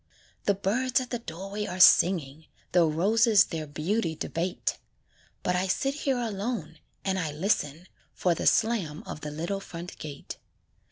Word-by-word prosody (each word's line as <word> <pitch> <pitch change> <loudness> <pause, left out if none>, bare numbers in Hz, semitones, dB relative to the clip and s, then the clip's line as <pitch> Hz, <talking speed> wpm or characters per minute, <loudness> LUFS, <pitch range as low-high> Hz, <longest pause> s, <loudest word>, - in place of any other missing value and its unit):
The 200 - +3
birds 240 +7 +1
at 255 -1 -6
the 240 - -1
doorway 195 +1 -5
are 185 - -5
singing, 160 -5 +5 0.2
The 175 -2 +5
roses 210 +6 +4
their 160 -5 -5
beauty 165 +4 -1
debate; 175 +3 -2 0.6
But 180 - +1
I 185 +1 +1
sit 270 +8 0
here 275 -3 -1
alone, 205 -8 -3 0.3
and 190 -1 0
I 160 -4 -2
listen 155 0 -1 0.3
For 180 - +2
the - - -1
slam 200 -10 +1
of 150 - -7
the 150 - -4
little 170 +6 -3
front 175 -2 -9
gate. 145 -2 -8
185 Hz, 155 wpm, -28 LUFS, 160-215 Hz, 0.6 s, singing